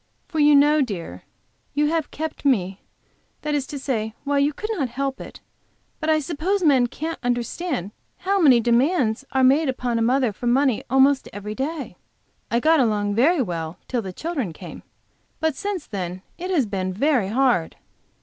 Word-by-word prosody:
For 320 Hz, -, -3 dB
you 295 Hz, 0 st, +6 dB
know, 295 Hz, +2 st, +5 dB
dear, 175 Hz, -, -5 dB, 0.5 s
you 295 Hz, +1 st, +3 dB
have 325 Hz, -2 st, -1 dB
kept 315 Hz, 0 st, -5 dB
me 195 Hz, -9 st, +1 dB, 0.6 s
that 300 Hz, -, -1 dB
is 285 Hz, -2 st, -1 dB
to 290 Hz, -, -6 dB
say 225 Hz, -5 st, -3 dB
you 285 Hz, +1 st, +2 dB
could 430 Hz, +9 st, -5 dB
not 285 Hz, -, -1 dB
help 270 Hz, +2 st, -3 dB
it, -, -, -10 dB, 0.6 s
but 315 Hz, -, -2 dB
I 315 Hz, -, +4 dB
suppose 340 Hz, +6 st, -1 dB
men 265 Hz, -6 st, +4 dB
can't 320 Hz, +6 st, -5 dB
understand 245 Hz, -, -2 dB, 0.3 s
how 390 Hz, +1 st, 0 dB
many 265 Hz, -7 st, +6 dB
demands 240 Hz, +1 st, +1 dB
are 265 Hz, -1 st, +2 dB
made 275 Hz, +3 st, +4 dB
upon 245 Hz, -2 st, -1 dB
a -, -, 0 dB
mother 250 Hz, -1 st, +2 dB
for 240 Hz, -, -5 dB
money 260 Hz, -1 st, +2 dB
almost 270 Hz, +2 st, +3 dB
every 205 Hz, +1 st, -6 dB
day. 280 Hz, +5 st, -4 dB, 0.5 s
I 235 Hz, -, +2 dB
got 320 Hz, +4 st, +4 dB
along 210 Hz, -4 st, +1 dB
very 275 Hz, -, +3 dB
well 165 Hz, -4 st, -5 dB
till 245 Hz, -2 st, -1 dB
the 190 Hz, -3 st, -6 dB
children 270 Hz, -, -3 dB
came, -, -, -10 dB, 0.6 s
but 320 Hz, -3 st, 0 dB
since 400 Hz, -1 st, -4 dB
then 185 Hz, -2 st, -5 dB
it 365 Hz, +2 st, -6 dB
has 325 Hz, -9 st, +2 dB
been 190 Hz, -3 st, -3 dB
very 245 Hz, +1 st, +1 dB
hard." 235 Hz, -6 st, +1 dB
265 Hz, 175 wpm, -23 LUFS, 220-305 Hz, 0.6 s, you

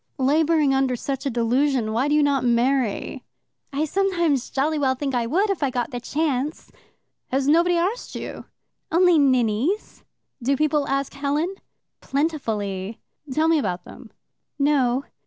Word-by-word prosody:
"Labouring 300 Hz, +1 st, +3 dB
under 265 Hz, -1 st, +1 dB
such 275 Hz, +3 st, -3 dB
a -, -, +1 dB
delusion, 240 Hz, 0 st, +1 dB
why 245 Hz, +5 st, +1 dB
do 295 Hz, -, +2 dB
you 300 Hz, -, +4 dB
not 280 Hz, -3 st, +2 dB
marry?" 245 Hz, -1 st, 0 dB, 0.5 s
"I 290 Hz, +2 st, 0 dB
sometimes 340 Hz, -6 st, 0 dB
jolly 300 Hz, +3 st, 0 dB
well 265 Hz, -2 st, +2 dB
think 275 Hz, 0 st, -3 dB
I 240 Hz, -2 st, 0 dB
would 390 Hz, -, +1 dB
if 385 Hz, -, -3 dB
I 280 Hz, -, +2 dB
got 250 Hz, +1 st, -2 dB
the 245 Hz, -, -4 dB
chance." 290 Hz, +2 st, -2 dB, 0.6 s
"Has 270 Hz, +1 st, 0 dB
nobody 340 Hz, +3 st, +4 dB
arst 385 Hz, +8 st, -2 dB
you?" -, -, -6 dB, 0.5 s
"Only 350 Hz, -1 st, +5 dB
ninnies." 255 Hz, -, +1 dB, 0.4 s
"Do 270 Hz, +3 st, +1 dB
people 300 Hz, -1 st, +1 dB
ask 275 Hz, 0 st, -1 dB
Helen?" 290 Hz, +6 st, -1 dB, 0.5 s
"Plentifully." 220 Hz, -, -2 dB, 0.3 s
"Tell 310 Hz, +4 st, +2 dB
me 325 Hz, -1 st, +4 dB
about 180 Hz, -8 st, -2 dB
them." 235 Hz, -, -12 dB, 0.5 s
"No." 275 Hz, -3 st, +2 dB
275 Hz, 150 wpm, -23 LUFS, 250-310 Hz, 0.6 s, Only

